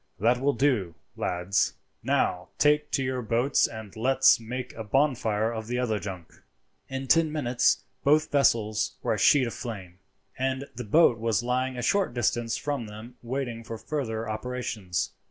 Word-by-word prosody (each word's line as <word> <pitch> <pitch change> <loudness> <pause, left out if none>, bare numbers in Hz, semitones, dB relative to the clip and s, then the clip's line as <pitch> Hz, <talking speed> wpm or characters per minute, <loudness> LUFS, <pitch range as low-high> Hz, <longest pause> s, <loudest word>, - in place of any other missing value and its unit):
"That 120 +4 +2
will 140 +1 +2
do, 120 - +1 0.2
lads. 90 +3 0 0.3
Now 90 0 0
take 150 0 +3
to 135 - +1
your 130 -1 -2
boats 120 +4 +2
and 110 -3 -9
let's 130 +4 +4
make 125 +2 -6
a 110 - -6
bonfire 115 -3 +1
of 110 -1 -5
the 125 +1 -2
other 115 -4 0
junk." 95 -5 -8 0.5
In 135 0 -4
ten 160 +3 +3
minutes 125 -5 +1 0.2
both 155 +2 +3
vessels 110 -7 +2
were - - +1
a 105 - -2
sheet 135 +5 +5
of 115 - -4
flame, 95 -7 -7 0.4
and 130 +1 -1
the 125 0 -6
boat 120 0 +4
was 115 0 0
lying 130 +1 -1
a 125 - -3
short 190 -2 +1
distance 120 -1 0
from 140 -6 -3
them 110 +4 -11
waiting 120 -2 -4
for 115 0 -6
further 115 -5 -3
operations. 110 -4 -3
120 Hz, 165 wpm, -27 LUFS, 110-135 Hz, 0.5 s, sheet